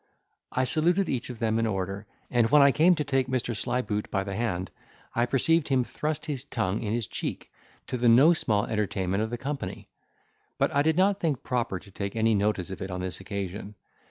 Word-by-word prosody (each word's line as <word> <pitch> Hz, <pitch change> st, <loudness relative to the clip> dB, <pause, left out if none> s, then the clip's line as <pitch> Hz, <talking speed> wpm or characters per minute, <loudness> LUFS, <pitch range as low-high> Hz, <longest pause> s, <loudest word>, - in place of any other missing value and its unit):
I 130 Hz, -, +1 dB
saluted 170 Hz, +9 st, +2 dB
each 125 Hz, -2 st, -2 dB
of 125 Hz, -, -6 dB
then 110 Hz, 0 st, 0 dB
in 115 Hz, -, +1 dB
order, 100 Hz, 0 st, -3 dB, 0.2 s
and 120 Hz, -2 st, +3 dB
when 150 Hz, -1 st, +7 dB
I 140 Hz, -, +6 dB
came 170 Hz, +6 st, +5 dB
to 155 Hz, -, -1 dB
take 135 Hz, -3 st, 0 dB
Mr. 125 Hz, -2 st, -1 dB
Slyboot 110 Hz, -2 st, -2 dB
by 95 Hz, -, 0 dB
the 100 Hz, 0 st, -5 dB
hand, 95 Hz, -5 st, -2 dB, 0.4 s
I 120 Hz, +1 st, +1 dB
perceived 160 Hz, +5 st, +2 dB
him 130 Hz, -3 st, +2 dB
thrust 150 Hz, +4 st, -3 dB
his 140 Hz, -5 st, -3 dB
tongue 110 Hz, -8 st, -2 dB
in 105 Hz, -, -2 dB
his 115 Hz, -1 st, 0 dB
cheek, -, -, -5 dB, 0.3 s
to 125 Hz, -, -3 dB
the 120 Hz, 0 st, +3 dB
no 135 Hz, +9 st, +7 dB
small 105 Hz, -10 st, +1 dB
entertainment 100 Hz, -2 st, -1 dB
of 110 Hz, -, -1 dB
the 120 Hz, -, -3 dB
company; 140 Hz, +3 st, -5 dB, 0.7 s
but -, -, +1 dB
I 140 Hz, -, +3 dB
did 160 Hz, +2 st, +2 dB
not 195 Hz, +1 st, +3 dB
think 150 Hz, -7 st, -1 dB
proper 120 Hz, -6 st, -1 dB
to 100 Hz, -, -14 dB
take 100 Hz, +1 st, -4 dB
any 115 Hz, 0 st, +3 dB
notice 100 Hz, -3 st, 0 dB
of 95 Hz, -, -7 dB
it 95 Hz, -, -4 dB
on 90 Hz, 0 st, -4 dB
this 90 Hz, -2 st, -4 dB
occasion. 100 Hz, +1 st, -5 dB
115 Hz, 215 wpm, -27 LUFS, 100-140 Hz, 0.7 s, when